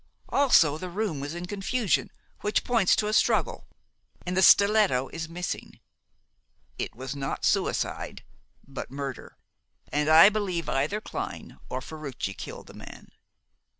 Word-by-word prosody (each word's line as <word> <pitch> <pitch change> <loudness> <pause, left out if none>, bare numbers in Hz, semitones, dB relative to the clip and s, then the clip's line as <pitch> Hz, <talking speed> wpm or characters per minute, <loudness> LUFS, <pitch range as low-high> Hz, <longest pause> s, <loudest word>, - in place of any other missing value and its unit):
Also 165 - +4
the 185 - -5
room 190 -5 -2
was 145 +4 -5
in 175 +1 -5
confusion, 205 +3 -1 0.3
which 210 - 0
points 230 -7 +3
to 210 - 0
a 215 - -1
struggle, - - +1 0.6
and 180 +1 -2
the 190 - +3
stiletto 200 -11 +5
is 160 -1 -6
missing. 180 +1 -5 1.0
It - - -4
was 130 +3 -6
not 135 -1 -3
suicide, - - -1 0.4
but 135 -1 -7
murder, 135 -2 -7 0.5
and 150 +1 0
I 160 +5 +9
believe 195 -5 -2
either 150 +11 -1
Clyne - - -7
or 130 - -3
Ferruci 140 -8 -6
killed - - -9
the - - -14
man." - - -12
170 Hz, 140 wpm, -27 LUFS, 140-205 Hz, 1.0 s, I